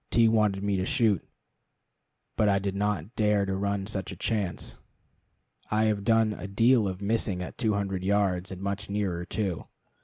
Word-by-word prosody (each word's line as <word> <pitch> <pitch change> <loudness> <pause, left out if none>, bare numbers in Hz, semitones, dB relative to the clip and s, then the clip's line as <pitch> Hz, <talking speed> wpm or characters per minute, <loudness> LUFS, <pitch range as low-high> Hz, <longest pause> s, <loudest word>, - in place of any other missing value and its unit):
T 115 -1 +4
wanted 105 -3 +2
me 100 -1 +1
to 95 - 0
shoot, 110 - +2 1.1
but 105 - +3
I 100 - +3
did 100 0 -2
not 105 -1 -2
dare 105 -2 +2
to 95 0 -2
run 100 0 -1
such 100 -2 -4
a - - -7
chance. 105 -6 -2 0.9
I 105 +1 +2
have 105 -2 +1
done 115 0 +3
a 95 -1 -7
deal 115 +2 +3
of 95 +1 -5
missing 100 -4 0
at - - -8
two 110 -4 +1
hundred 95 -2 -2
yards, 95 -2 +1
and 95 +1 -7
much 100 +1 -3
nearer, 95 -4 -2
too. 95 -4 -3
100 Hz, 180 wpm, -28 LUFS, 95-110 Hz, 1.1 s, T